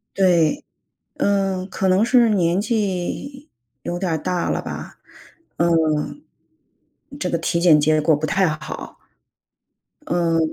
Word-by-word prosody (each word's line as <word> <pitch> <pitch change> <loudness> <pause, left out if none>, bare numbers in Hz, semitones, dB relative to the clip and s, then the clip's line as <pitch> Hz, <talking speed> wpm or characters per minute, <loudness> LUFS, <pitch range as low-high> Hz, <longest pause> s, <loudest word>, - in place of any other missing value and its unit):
对， 180 - +2 0.5
嗯， 195 -2 0
可 190 - -2
能 190 +4 +3
是 240 -1 +4
年 180 -2 +2
纪 220 - -3 0.3
有 175 - -4
点 180 -1 -2
儿 160 - 0
大 180 +2 -2
了 - - -1
吧， - - -8 0.6
嗯， 165 - +1 1.0
这 - - -1
个 170 - 0
体 170 +1 -1
检 160 -4 +5
结 155 +1 +2
果 155 +1 +3
不 155 +2 -3
太 195 -1 +2
好。 155 -1 -7 1.1
嗯， 170 -1 +1
175 Hz, 135 characters per minute, -21 LUFS, 165-195 Hz, 1.1 s, 检